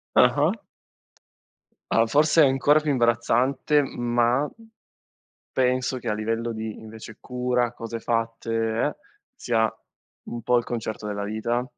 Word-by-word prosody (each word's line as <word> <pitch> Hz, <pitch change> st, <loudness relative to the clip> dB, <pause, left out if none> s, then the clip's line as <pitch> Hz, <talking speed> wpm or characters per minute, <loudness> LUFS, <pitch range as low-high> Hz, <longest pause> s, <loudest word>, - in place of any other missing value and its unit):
Ah-ah. -, -, +4 dB, 1.4 s
Allora 115 Hz, 0 st, +3 dB
forse 150 Hz, +5 st, +4 dB
è -, -, +6 dB
ancora 135 Hz, +3 st, +4 dB
più 150 Hz, -1 st, -1 dB
imbarazzante 130 Hz, +4 st, +2 dB
ma 120 Hz, +2 st, 0 dB, 1.1 s
penso 130 Hz, 0 st, +1 dB
che 120 Hz, -2 st, -4 dB
a -, -, +1 dB
livello 115 Hz, +2 st, -2 dB
di 110 Hz, -1 st, -5 dB
invece 110 Hz, 0 st, -11 dB
cura, 125 Hz, -1 st, -1 dB
cose 115 Hz, 0 st, -6 dB
fatte 115 Hz, 0 st, -2 dB
e 115 Hz, 0 st, +1 dB
eh, -, -, -5 dB, 0.4 s
sia 110 Hz, -2 st, +1 dB, 0.6 s
un 120 Hz, -, -5 dB
po' 125 Hz, +2 st, +3 dB
il 120 Hz, -, +1 dB
concerto 110 Hz, -3 st, -5 dB
della 100 Hz, -1 st, -3 dB
vita. 110 Hz, +4 st, -1 dB
120 Hz, 135 wpm, -25 LUFS, 115-125 Hz, 1.4 s, è